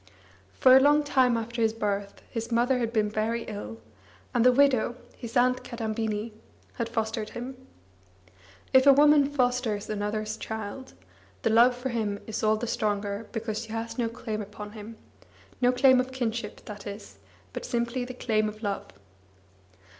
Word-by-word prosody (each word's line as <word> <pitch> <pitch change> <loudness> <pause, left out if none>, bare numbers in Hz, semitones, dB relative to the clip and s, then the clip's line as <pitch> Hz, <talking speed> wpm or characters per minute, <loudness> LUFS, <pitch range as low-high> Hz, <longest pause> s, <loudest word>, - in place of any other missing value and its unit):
Far 255 0 +7
a - - +8
long 295 +2 +4
time 260 -4 +3
after 230 +1 -4
his 220 -1 +2
birth, 200 -2 -3
his 230 0 -5
mother 245 +2 +2
had 230 -2 -1
been 215 -2 +1
very 220 +2 -1
ill, 115 - -7 0.6
and 235 - +3
the 250 - +7
widow, 255 -3 +3 0.2
his 235 0 -4
aunt 250 +1 +3
Kadambini, 220 -1 -3 0.4
had 235 -1 -3
fostered 220 -1 -2
him. 250 +2 -6 1.2
If 260 +1 +6
a 280 - +10
woman 290 0 +6
fosters 250 -7 0
another's 215 +1 -2
child, 220 +4 -6 0.5
her 225 - +2
love 240 +3 +6
for 255 +1 -3
him 215 -4 -2
is 220 - -4
all 215 0 +3
the 230 - -3
stronger 205 -1 -2
because 225 -2 -3
she 225 - -9
has 230 +2 -4
no 230 -1 +1
claim 225 -2 -5
upon 210 0 -8
him 215 +1 -10 0.6
no 245 0 +5
claim 260 0 +5
of 255 +1 -1
kinship, 230 -4 -4
that 210 0 -8
is, 200 - -9 0.3
but - - -5
simply 235 0 -1
the 255 0 -7
claim 215 -3 0
of 215 +1 -11
love. 200 -1 -2
230 Hz, 165 wpm, -27 LUFS, 215-250 Hz, 1.2 s, a